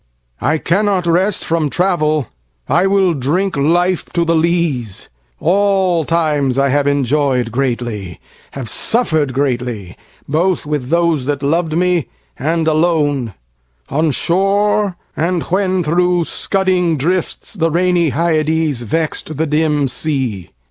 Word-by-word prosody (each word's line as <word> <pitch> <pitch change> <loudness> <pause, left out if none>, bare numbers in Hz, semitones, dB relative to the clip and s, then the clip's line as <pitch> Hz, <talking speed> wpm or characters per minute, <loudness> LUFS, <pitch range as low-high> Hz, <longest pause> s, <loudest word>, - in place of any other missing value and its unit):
I 150 +6 +1
cannot 190 +2 +1
rest 185 +4 +1
from 165 -3 0
travel: 155 -5 +1 0.4
I 185 +2 +2
will 195 -2 +3
drinkLife 170 +4 0
to 170 -1 +1
the 165 - +1
lees: 160 - -1 0.3
all 190 -2 +2
times 150 -6 +1
I 140 0 +2
have 145 +1 +1
enjoy'dGreatly, 125 - -1 0.4
have 135 -4 -6
suffer'd 160 - +1
greatly, 125 -8 -2 0.3
both 170 +4 0
with 145 -4 -3
thoseThat 150 -5 0
lov'd 160 +2 0
me, 180 -3 +1 0.3
and 160 +3 -1
alone; 150 - +1 0.5
on 155 +3 +1
shore, 195 +5 +1 0.2
and 170 +1 0
whenThro' 180 -2 +1
scudding 185 -4 0
drifts 175 +5 -2
the 165 -5 0
rainy 175 0 +2
HyadesVex'd 155 -2 -1
the 160 - +1
dim 150 -2 +1
sea. 130 - -2
160 Hz, 110 wpm, -16 LUFS, 140-180 Hz, 0.5 s, will